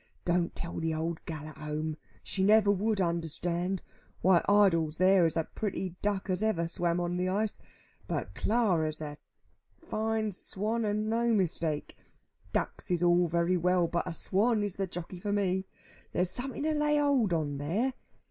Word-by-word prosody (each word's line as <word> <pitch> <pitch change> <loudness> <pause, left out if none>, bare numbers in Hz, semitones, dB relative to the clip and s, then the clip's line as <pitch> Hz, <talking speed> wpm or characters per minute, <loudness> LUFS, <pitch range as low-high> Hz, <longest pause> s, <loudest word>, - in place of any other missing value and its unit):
Don't 175 -1 +1
tell 170 - -5
the 160 -1 -1
old 160 +1 -3
gal 155 -2 -5
at - - -13
home. 155 +1 -3 0.3
She 190 - -3
never 210 0 +6
would 205 +1 0
understand. 170 +1 -1 0.4
Why 185 -2 +5
Idols 165 -7 +4
there 185 -1 +5
is 165 - 0
a 165 - +2
pretty 190 -1 -4
duck 200 -2 -1
as 185 0 -1
ever 190 -7 +1
swam 170 0 0
on 175 0 -1
the 180 +1 0
ice. 210 +3 0 0.5
But 95 - -3
Clara's 175 - +1
a 150 -1 -6 0.6
fine 220 - -1
swan, 215 +4 -1
and 210 +1 0
no 230 +1 +1
mistake. 165 -5 0 0.6
Ducks - - -2
is 175 -1 +1
all 175 0 +4
very 170 +2 +1
well, 180 0 +3
but 170 +2 -2
a 170 - -4
swan 210 +6 +1
is 200 -2 -3
the 195 -1 -1
jockey 175 +1 -7
for 205 +3 -3
me. 190 -2 0 0.5
There's 180 0 +1
something 265 +3 -5
to 310 0 +1
lay 300 0 +2
hold 280 -8 +3
on 150 -4 -1
there. 205 - 0
180 Hz, 170 wpm, -30 LUFS, 170-210 Hz, 0.6 s, never